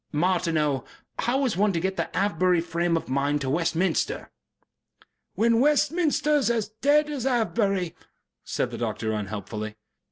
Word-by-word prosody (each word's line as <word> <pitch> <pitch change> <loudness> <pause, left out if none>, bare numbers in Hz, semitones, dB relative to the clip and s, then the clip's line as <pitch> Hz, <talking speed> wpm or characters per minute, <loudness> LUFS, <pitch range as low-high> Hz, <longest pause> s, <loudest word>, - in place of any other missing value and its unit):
Martineau, 155 -4 +1 0.4
how 265 +4 +1
is 245 - 0
one 205 +2 +3
to 170 - 0
get 190 +3 -1
the - - -2
Avebury 185 -2 +2
frame 170 0 0
of - - -5
mind 140 +3 0
to 130 -1 -1
Westminster?" 170 +3 0 1.0
"When 230 +1 +3
Westminster 300 +1 +2
is 275 - +1
as 225 -3 0
dead 290 +7 +2
as 275 -4 -3
Avebury," 205 -7 0 0.5
said - - -2
the - - -6
doctor, 110 -1 -2
unhelpfully. 105 +1 -4
185 Hz, 140 wpm, -26 LUFS, 155-240 Hz, 1.0 s, one